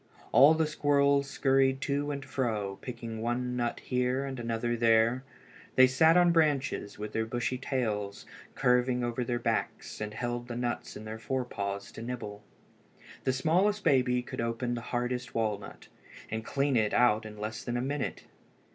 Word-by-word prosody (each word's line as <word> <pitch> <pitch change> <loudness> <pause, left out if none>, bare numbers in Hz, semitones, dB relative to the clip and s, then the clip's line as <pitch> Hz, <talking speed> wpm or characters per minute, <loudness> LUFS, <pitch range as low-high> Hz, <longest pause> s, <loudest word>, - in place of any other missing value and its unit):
All 145 +4 +7
the 160 0 +2
squirrels 140 -2 +2
scurried 135 -1 +2
to 145 +1 -1
and 140 -2 -4
fro, 110 -8 -2
picking 115 -3 -6
one 125 +2 -1
nut 120 -1 -2
here, 125 +1 0
and 135 -2 -5
another 120 0 -1
there. 115 +2 +3 0.5
They 130 - +8
sat 160 +6 +5
on 175 -1 +6
the - - +3
branches, 145 -9 +1
with 105 +1 -6
their 110 0 -1
bushy 120 +2 -2
tails 110 -7 -2 0.3
curving 125 0 +2
over 120 +1 -1
their 120 0 -1
backs, 120 - -2
and 105 0 -4
held 120 0 -3
the 120 - -5
nuts 120 0 -3
in 110 - -9
their 110 +1 -6
fore 130 +2 -2
paws 100 -3 -4
to - - -9
nibble. 115 -4 -6 0.8
The 130 - +2
smallest 185 +10 +2
baby 125 -2 +3
could - - -5
open 115 +1 -2
the 120 - -3
hardest 125 +1 -3
walnut, 110 -3 -3 0.4
and 110 0 -2
clean 140 +3 0
it 110 -3 +2
out 115 -3 +4
in 105 -1 -9
less 110 +1 -5
than 120 0 -2
a - - 0
minute. 140 +2 -3
125 Hz, 175 wpm, -30 LUFS, 115-135 Hz, 0.8 s, They